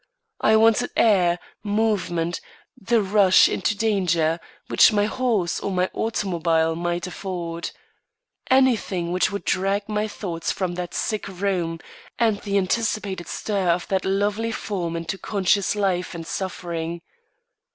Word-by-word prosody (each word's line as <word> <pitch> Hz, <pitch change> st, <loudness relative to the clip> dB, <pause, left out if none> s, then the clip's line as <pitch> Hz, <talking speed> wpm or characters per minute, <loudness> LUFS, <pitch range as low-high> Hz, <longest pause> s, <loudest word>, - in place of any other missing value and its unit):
I 220 Hz, -, +4 dB
wanted 225 Hz, +2 st, +4 dB
air, 180 Hz, -6 st, +4 dB, 0.3 s
movement, 205 Hz, -6 st, 0 dB, 0.3 s
the 230 Hz, -2 st, +1 dB
rush 195 Hz, -1 st, +5 dB
into 210 Hz, -, -1 dB
danger, 175 Hz, -7 st, +1 dB, 0.3 s
which -, -, +6 dB
my 205 Hz, -1 st, +2 dB
horse 220 Hz, -7 st, 0 dB
or -, -, -3 dB
my 185 Hz, -1 st, 0 dB
automobile 165 Hz, -7 st, 0 dB
might 175 Hz, +1 st, -2 dB
afford. 175 Hz, -2 st, -5 dB, 0.8 s
Anything 230 Hz, -10 st, +2 dB
which 180 Hz, +1 st, +1 dB
would 200 Hz, -, -5 dB
drag 195 Hz, +2 st, 0 dB
my 210 Hz, 0 st, -1 dB
thoughts 175 Hz, -6 st, -4 dB
from 185 Hz, -2 st, -2 dB
that 175 Hz, 0 st, -5 dB
sick 215 Hz, -3 st, -2 dB
room, 180 Hz, -3 st, -2 dB, 0.4 s
and 220 Hz, -4 st, +1 dB
the 200 Hz, -1 st, 0 dB
anticipated 195 Hz, -2 st, -1 dB
stir 200 Hz, -4 st, -1 dB
of 170 Hz, +1 st, +1 dB
that 190 Hz, -1 st, +1 dB
lovely 205 Hz, +4 st, 0 dB
form 180 Hz, -7 st, -3 dB
into 165 Hz, +3 st, -4 dB
conscious 200 Hz, -1 st, +1 dB
life 190 Hz, -3 st, -1 dB
and 165 Hz, -1 st, -6 dB
suffering. 170 Hz, -2 st, -4 dB
190 Hz, 130 wpm, -23 LUFS, 175-210 Hz, 0.8 s, which